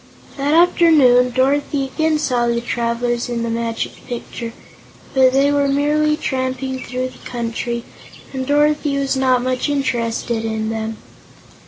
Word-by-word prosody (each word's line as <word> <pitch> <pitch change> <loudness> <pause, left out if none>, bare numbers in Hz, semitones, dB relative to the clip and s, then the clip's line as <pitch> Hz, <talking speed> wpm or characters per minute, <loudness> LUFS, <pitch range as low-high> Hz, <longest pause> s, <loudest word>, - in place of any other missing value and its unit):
That 285 +2 +1
afternoon 310 -8 +5
Dorothy 275 +3 +1
again 315 -1 +2
saw 245 -5 0
the 235 0 +1
travelers 240 0 -1
in 235 -1 -2
the 230 - -2
Magic 230 0 -3
Picture, 235 -1 -6 0.6
but 260 -1 +5
they 275 +2 +3
were 285 -1 +2
merely 300 +2 +2
tramping 260 -2 -2
through 255 0 -3
the - - -16
country 235 0 -4 0.5
and 260 -1 -3
Dorothy 295 0 +2
was 275 -1 0
not 255 -2 +2
much 255 +3 -1
interested 235 -4 -1
in 220 -1 -2
them. 220 0 -4
255 Hz, 140 wpm, -19 LUFS, 235-285 Hz, 0.6 s, afternoon